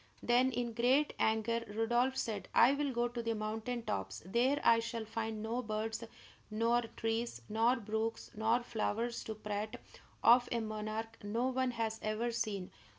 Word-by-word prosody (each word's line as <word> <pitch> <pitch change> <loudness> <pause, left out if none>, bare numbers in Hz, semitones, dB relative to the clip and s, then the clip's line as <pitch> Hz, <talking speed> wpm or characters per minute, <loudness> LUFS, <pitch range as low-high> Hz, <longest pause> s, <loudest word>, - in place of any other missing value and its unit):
Then, 250 +2 +4
in 240 -1 -2
great 255 +6 +3
anger, 220 +1 +1
Rodolph 240 +5 +1
said: 205 -4 -3
"I 245 +4 +7
will 285 -1 0
go 240 -1 +1
to 240 0 -4
the 230 -1 -1
mountain 220 +3 -3
tops; 95 - -3
there 245 +9 +2
I 230 0 +6
shall 230 -1 -3
find 220 0 -3
no 230 +3 -1
birds, 220 0 -3 0.5
nor 230 +2 +2 0.2
trees, 225 +1 -2
nor 225 +3 +3
brooks, 220 -1 -3
nor 225 +3 +2
flowers 230 +1 -2
to 220 - -4
prate 210 +1 -4 0.5
of 245 +1 +6
a 235 - +1
monarch 215 +1 -4
no 230 +5 0
one 260 0 +1
has 225 -2 -2
ever 215 +3 -1
seen. 205 -5 -2
225 Hz, 160 wpm, -34 LUFS, 215-240 Hz, 0.5 s, I